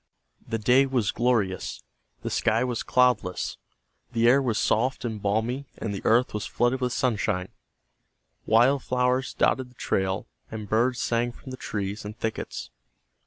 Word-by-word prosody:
The 115 - -1
day 125 +5 +4
was 125 -6 +1
glorious. 115 -6 0 0.4
The - - -3
sky 115 +3 +2
was 125 -2 -2
cloudless, 125 -8 +1 0.6
the 115 0 +3
air 135 +3 +6
was 120 -5 0
soft 125 +3 +1
and 110 -3 -4
balmy 115 +7 -1
and 105 - -3
the 100 - -4
earth 120 +3 +3
was 105 -1 -3
flooded 120 +2 +1
with 125 -1 0
sunshine. 105 -7 0 1.0
Wild 125 +5 +4
flowers 125 +1 0
dotted 130 -1 +1
the 125 - -22
trail, 95 -4 -1 0.2
and 110 -2 -6
birds 120 +4 +2
sang 120 +1 0
from 130 +2 -11
the - - -5
trees 100 -2 -4
and 105 +2 -7
thickets. 110 -2 -4
120 Hz, 155 wpm, -26 LUFS, 105-125 Hz, 1.0 s, air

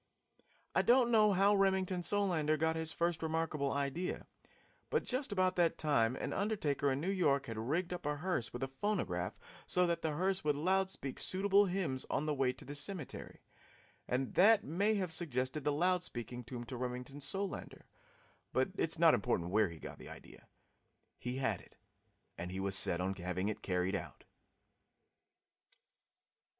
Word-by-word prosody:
I - - +4
don't 240 -1 +4
know 215 -2 +5
how 195 +2 +4
Remington 190 -2 +2
Solander 175 -6 +1
first - - -13
got 160 +1 +1
his 160 +1 -1
remarkable 160 -3 -1
idea, 140 +6 -2 0.6
but - - +1
just 255 -1 -2
about 185 -2 +2
that 170 -2 +3
time 130 -6 +2
an - - -3
undertaker 150 -10 0
in 135 - -1
New 180 +6 -1
York 145 -8 +2
had 115 -1 -5
rigged 165 +10 -1
up 175 -4 -5
a 150 - 0
hearse 160 -6 -2
with 120 +2 -5
a - - 0
phonograph 205 +11 -2 0.3
so 180 -2 +3
that 170 -1 0
the 160 -2 -1
hearse 185 +4 0
would 150 -1 +2
loud 190 +5 +2
speak 140 -8 -5
suitable 200 +1 +3
hymns 175 -8 -2
on 150 - 0
the 155 - 0
way 135 -2 +2
to 130 - -12
the 145 - -6
cemetery, 145 +1 -4 0.7
and 130 +1 -1
that 205 +3 +6
may 200 +8 +1
have 185 -5 -2
suggested 135 -3 -2
the 145 - +2
loud 180 +4 +2
speaking 120 -5 -6
tomb 120 0 -6
to 120 +2 -7
Remington 125 +3 -5
Solander, 195 +7 -3 0.7
but - - +2
it - - +1
is - - +1
not - - +6
important 85 +1 0
where 105 -1 +3
he 85 - -9
got - - -9
the - - -10
idea. - - -13 0.7
He 125 +1 -4
had 130 -8 -1
it, - - -20 0.6
and 90 - -4
he 95 - -4
was 95 0 0
set 90 -3 +4
on 95 +1 0
having 95 +1 -2
it 110 - -4
carried 90 0 0
out. 100 - -5
155 Hz, 175 wpm, -35 LUFS, 130-185 Hz, 0.7 s, that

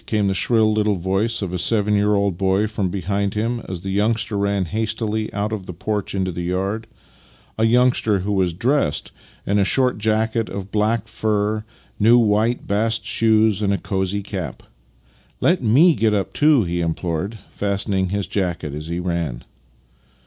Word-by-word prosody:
" - - -32
came 105 -2 +1
the 95 - +1
shrill 110 +2 +2
little 105 -1 +1
voice 95 +5 -1
of 90 -2 -4
a 90 - -2
seven 105 +1 +1
3'ear 105 +1 +2
old 100 -2 0
boy 95 +3 +1
from 105 -3 -2
behind 100 +2 -2
him, 115 +3 -1
as 90 -2 -5
the 95 - -4
youngster 110 +2 0
ran 100 -1 0
hastily 110 +2 -2
out 105 +1 -2
of 95 -4 -5
the 90 - -6
porch 105 +2 -3
into 95 -1 -1
the 85 - -5
yard 95 +5 -2 0.3
— 60 0 -30
a 110 - +3
youngster 115 -4 +3
who 100 +3 -2
was 95 -3 +1
dressed 120 - 0 0.3
in 100 +1 +1
a - - +4
short 125 +3 +1
jacket 110 +1 0
of 100 0 -6
black 110 +1 0
fur, 110 -1 -1 0.4
new 115 +3 +6
white 110 +1 +2
bast 110 +2 0
shoes, 110 -2 +2
and 100 -1 +1
a 100 - +1
cosy 95 0 -2
cap. 95 -5 -6 0.4
" - - -34
Let 175 +1 +3
f)ie 135 +10 +5
get 110 -1 +2
up 100 - -2
too," 150 -5 +4
he 85 -1 -2
implored, 85 +5 -2
fastening 100 -2 -1
his 100 +1 -1
jacket 85 -7 -2
as 75 +2 -6
he 85 +1 -3
ran. 85 -8 -3
105 Hz, 185 wpm, -21 LUFS, 95-110 Hz, 0.4 s, new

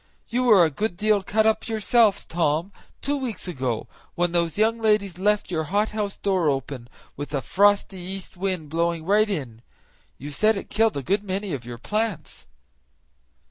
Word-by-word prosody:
You 250 +2 0
were 205 -8 +7
a 160 - -1
good 205 +5 -2
deal 210 0 +2
cut 215 +3 +1
up 220 0 +1
yourself, 220 -1 +2
Tom, 165 +2 0 0.3
two 285 +1 0
weeks 245 -8 -5
ago, 130 -9 -3 0.3
when 175 0 +1
those 170 -2 0
young 225 +2 +2
ladies 210 -5 +1
left 205 -1 +1
your 160 -2 -1
hothouse 205 +2 -1
door 185 -6 +1
open, 135 -3 -3 0.3
with 145 +1 -5
a 135 - 0
frosty 200 -1 +2
east 190 +2 -7
wind 180 -5 -3
blowing 165 0 -1
right 210 +3 +3
in; 130 - -4 0.6
you 145 +3 -7
said 215 +9 +2
it - - -8
killed 225 -6 +2
a 140 - -3
good 200 +9 0
many 195 -1 -3
of 125 -4 -5
your 120 -1 -7
plants." 210 - -3
190 Hz, 175 wpm, -24 LUFS, 160-215 Hz, 0.6 s, were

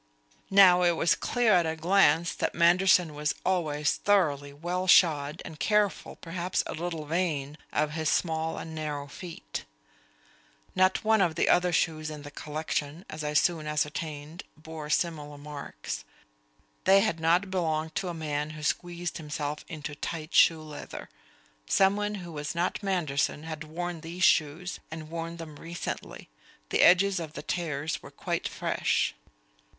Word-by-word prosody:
Now 190 -2 +7
it 175 -1 +4
was 165 - +3
clear 240 -3 +2
at 175 -2 +4
a 160 - -1
glance 170 -1 +3
that - - -2
Manderson 175 -1 +4
was 150 +1 -1
always 150 -5 +1
thoroughly 150 -9 +2
well 175 +5 -3
shod 155 -4 +4
and 155 - -9
careful, 210 -2 +1
perhaps 175 +1 -2
a - - -5
little 165 -1 -4
vain, 150 -3 -1 0.2
of 150 0 0
his 155 0 -1
small 160 -1 0
and 160 - -7
narrow 150 -2 -4
feet. 150 - -7 1.1
Not 185 0 +3
one 220 -1 +4
of 170 -4 +2
the - - +1
other 180 0 +4
shoes 155 -2 0
in 150 -1 -8
the 145 - -9
collection, 155 +2 -4
as 155 0 -5
I 150 0 -2
soon 155 0 +2
ascertained, 150 +1 -3 0.2
bore 155 -1 -8
similar 150 -3 -1
marks; 145 - -7 0.8
they 195 +1 +7
had 195 -6 0
not 175 +4 +2
belonged 160 -3 -1
to 190 - -1
a 175 - -3
man 150 -2 -2
who 155 - -8
squeezed 175 +2 -2
himself 150 -1 -4
into 150 -3 -6
tight 155 +1 -5
shoe 160 -2 +5
leather. 150 -1 -8 0.6
Someone 205 - +2
who 170 - -8
was 150 +1 -4
not 175 +4 -1
Manderson 155 -7 0
had 155 -1 -6
worn 170 +1 -5
these 170 +3 -5
shoes, 160 +3 +2
and 155 0 -8
worn 165 0 -5
them 155 -3 -9
recently; 170 +1 -6 0.4
the - - +2
edges 185 +1 +5
of 160 -2 -6
the - - -7
tears 160 -3 -2
were - - -11
quite - - -3
fresh. - - 0
160 Hz, 155 wpm, -28 LUFS, 150-180 Hz, 1.1 s, Now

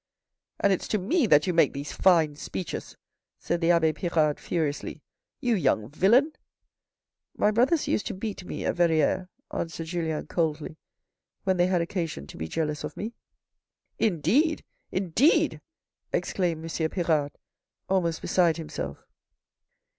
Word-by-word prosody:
" - - -57
And 200 - +4
it's 185 - -3
to 215 - +1
me 255 - +1
that 150 -4 +5
you 180 - 0
make 165 -4 +4
these 140 +1 -5
fine 165 -6 +3
speeches," 175 +4 -6 0.4
said 170 - -2
the 165 - +2
abbe 165 -2 +4
Pirard 155 -3 +1
furiously. 155 -4 -3 0.2
" - - -63
You 245 -2 +2
young 140 - +1
villain." 235 - +4 0.5
" - - -65 0.3
My 210 - +3
brothers 255 +9 +2
used - - 0
to 220 - -4
beat 200 -1 -5
me - - -5
at - - -1
Verrieres," 170 +1 +2 0.3
answered 165 -1 -3
Julien 160 -2 -2
coldly, 155 -2 -2 0.3
" - - -58
When 190 -1 +1
they 175 0 +4
had 180 -2 +2
occasion 165 - -4
to - - -12
be 80 - -4
jealous 150 - -2
of - - -6
me." 220 +3 -4 0.5
" - - -54
Indeed, 275 - +1 0.3
indeed," 195 - +2 0.5
exclaimed 170 -4 -1
M. 160 -1 -1
Pirard, 155 -6 0 0.5
almost 170 -4 0
beside 170 -3 +3
himself. 75 - -6
170 Hz, 155 wpm, -27 LUFS, 155-195 Hz, 0.5 s, that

